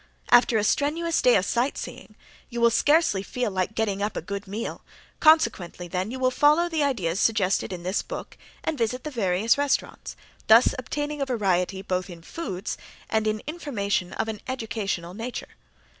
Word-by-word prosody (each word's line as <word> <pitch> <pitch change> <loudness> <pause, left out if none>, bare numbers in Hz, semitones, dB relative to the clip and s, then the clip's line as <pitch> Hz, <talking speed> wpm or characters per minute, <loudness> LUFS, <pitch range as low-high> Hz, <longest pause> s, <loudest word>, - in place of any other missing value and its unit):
After 245 -1 +6
a 210 - +1
strenuous 320 +8 +1
day 250 - +5
of 190 - +2
sight 245 +4 0
seeing - - -8 0.3
you 240 -1 -4
will 235 0 +5
scarcely 290 - +3
feel 245 +2 -2
like 190 +3 -2
getting 205 -3 -1
up 205 +1 -2
a - - -2
good 200 +2 -5
meal, 215 +4 -5 0.4
consequently 230 - +3
then 185 +3 -2
you 255 - -5
will 255 0 +2
follow 300 +6 +4
the 325 -3 -1
ideas 200 - 0
suggested 200 -4 +1
in 175 -2 -6
this 185 +3 0
book - - -7 0.3
and 315 -4 -2
visit 240 +2 -1
the 305 - -5
various 220 +1 +2
restaurants, 285 -1 -1 0.3
thus 225 +3 +7
obtaining 290 +4 -3
a - - +2
variety 195 -5 0
both 185 0 -2
in 170 -2 -10
foods 195 - -5 0.3
and 220 0 +1
in 215 0 -1
information 215 - -2
of - - -2
an 220 -2 -5
educational 215 -8 -3
nature. 230 +5 -6
220 Hz, 175 wpm, -25 LUFS, 195-265 Hz, 0.4 s, thus